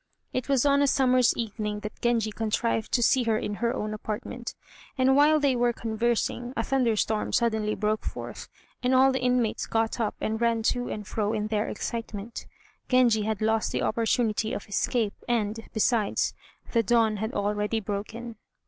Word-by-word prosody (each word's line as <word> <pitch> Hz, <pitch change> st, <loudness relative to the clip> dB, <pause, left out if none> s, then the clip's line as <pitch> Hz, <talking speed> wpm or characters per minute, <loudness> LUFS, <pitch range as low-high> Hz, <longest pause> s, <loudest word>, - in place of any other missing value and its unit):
It 255 Hz, +2 st, -3 dB
was 275 Hz, -1 st, +3 dB
on 280 Hz, 0 st, +4 dB
a 285 Hz, -, +4 dB
summer's 255 Hz, -2 st, +4 dB
evening 210 Hz, -2 st, -3 dB
that 210 Hz, -, -8 dB
Genji 230 Hz, -3 st, +1 dB
contrived 225 Hz, +1 st, -1 dB
to 240 Hz, -, +3 dB
see 260 Hz, +2 st, +4 dB
her 225 Hz, -1 st, +2 dB
in 210 Hz, -, -3 dB
her 235 Hz, 0 st, +2 dB
own 215 Hz, -4 st, -3 dB
apartment, 225 Hz, +3 st, -5 dB, 0.4 s
and 265 Hz, +1 st, +4 dB
while 300 Hz, +2 st, +5 dB
they 280 Hz, -3 st, +2 dB
were 240 Hz, 0 st, +2 dB
conversing, 235 Hz, +2 st, -1 dB
a 230 Hz, -, +1 dB
thunderstorm 225 Hz, -5 st, +1 dB
suddenly 220 Hz, -3 st, +1 dB
broke 215 Hz, 0 st, -1 dB
forth, -, -, -7 dB, 0.3 s
and 255 Hz, +1 st, +2 dB
all 265 Hz, +1 st, +6 dB
the 260 Hz, -1 st, -1 dB
inmates 250 Hz, -3 st, +1 dB
got 225 Hz, +1 st, 0 dB
up 220 Hz, -3 st, -1 dB
and 220 Hz, +1 st, -2 dB
ran 230 Hz, -1 st, +2 dB
to 245 Hz, +2 st, 0 dB
and 210 Hz, -1 st, -5 dB
fro 210 Hz, +2 st, -1 dB
in 215 Hz, -1 st, -2 dB
their 215 Hz, -1 st, 0 dB
excitement. 225 Hz, 0 st, -5 dB, 0.4 s
Genji 245 Hz, -4 st, +4 dB
had 220 Hz, -1 st, -2 dB
lost 220 Hz, 0 st, +1 dB
the -, -, -1 dB
opportunity 225 Hz, -1 st, 0 dB
of -, -, -5 dB
escape, 210 Hz, +1 st, 0 dB
and, 225 Hz, -2 st, -1 dB
besides, 220 Hz, -1 st, +1 dB, 0.4 s
the 230 Hz, -, +3 dB
dawn 225 Hz, -1 st, +2 dB
had 220 Hz, +3 st, -3 dB
already 210 Hz, +2 st, 0 dB
broken. 220 Hz, +3 st, -5 dB
225 Hz, 175 wpm, -27 LUFS, 215-245 Hz, 0.4 s, all